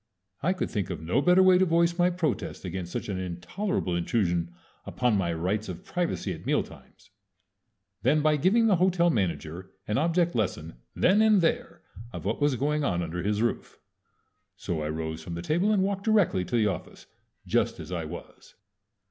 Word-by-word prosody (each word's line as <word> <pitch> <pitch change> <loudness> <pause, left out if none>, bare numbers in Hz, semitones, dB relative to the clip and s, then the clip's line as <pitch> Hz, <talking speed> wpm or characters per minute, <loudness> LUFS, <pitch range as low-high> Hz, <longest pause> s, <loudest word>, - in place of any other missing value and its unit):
I 175 +6 +2
could 190 - -3
think 100 -5 -2
of 90 -4 -4
no 85 - 0
better 180 +4 +5
way 185 -1 +6
to 190 - +4
voice 170 0 +2
my 175 +1 +5
protest 175 - -3
against 90 -1 -5
such - - -4
an 95 -3 -3
intolerable 95 - -3
intrusion 85 -2 0 0.3
upon 125 -3 0
my 90 -4 0
rights 95 +6 -2
of 90 -1 -8
privacy 170 - -2
at 80 - -10
mealtimes - - -4 0.9
than 145 +5 +2
by 155 -1 +3
giving 205 +10 +3
the 205 -5 +4
hotel 175 -1 +3
manager 90 - -2 0.2
an 105 +5 +1
object 170 +2 +1
lesson 80 - -2 0.2
then 200 +4 +4
and 215 -2 +5
there 165 - -1 0.3
of - - -7
what - - -2
was 145 -2 +3
going 150 +4 0
on 90 -9 0
under 85 +1 -4
his 105 +3 0
roof. 120 - -2 0.8
So 85 -5 -3
I 75 - -3
rose 80 0 -4
from 85 +1 -6
the 85 - -5
table 175 - +1
and 200 -3 +3
walked 195 0 -2
directly 205 - +3
to 120 - -3
the 110 -2 +3
office 95 -4 -4 0.4
just - - 0
as - - -8
I - - -3
was. - - -10
120 Hz, 185 wpm, -27 LUFS, -, 0.9 s, way